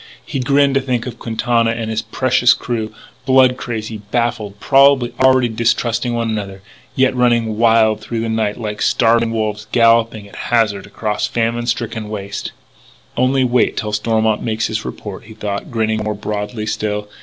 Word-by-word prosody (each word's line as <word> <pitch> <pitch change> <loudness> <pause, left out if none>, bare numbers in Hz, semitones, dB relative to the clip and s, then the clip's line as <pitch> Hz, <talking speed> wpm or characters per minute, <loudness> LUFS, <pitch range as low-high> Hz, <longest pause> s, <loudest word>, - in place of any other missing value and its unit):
He 135 - -4
grinned 140 +2 +3
to 135 - +2
think 125 -3 -2
of 120 -2 -7
Quintana 115 0 0
and 115 -1 -3
his 110 0 -1
precious 120 +2 +2
crew, 110 -3 -4 0.4
blood 130 -1 +5
crazy, 110 -3 -5
baffled, 115 -4 -2
probably 135 -2 +4
already 130 -1 +4
distrusting 120 +1 0
one 115 -1 -1
another, 100 -3 -4 0.3
yet 130 0 +2
running 120 -3 +1
wild 110 -2 +4
through 115 +1 -4
the 115 - -2
night 110 -2 -1
like 105 -2 -5
starving 115 0 +3
wolves 110 -1 -3
galloping 115 -2 +3
at - - -15
hazard 110 -5 +1
across 105 -2 -2
a - - -12
famine 120 +1 -1
stricken 115 -3 -3
waste. 100 -1 -5 0.6
"Only 130 +1 +2
wait 125 -1 +1
till 105 -2 -3
Stormont 110 0 +1
makes 110 0 -1
his 110 0 -3
report," 105 +1 -7
he 110 0 -12
thought, 100 -2 -4
grinning 110 -2 -1
more 105 0 -2
broadly 105 +1 -4
still. 105 -1 -2
115 Hz, 165 wpm, -18 LUFS, 110-120 Hz, 0.6 s, blood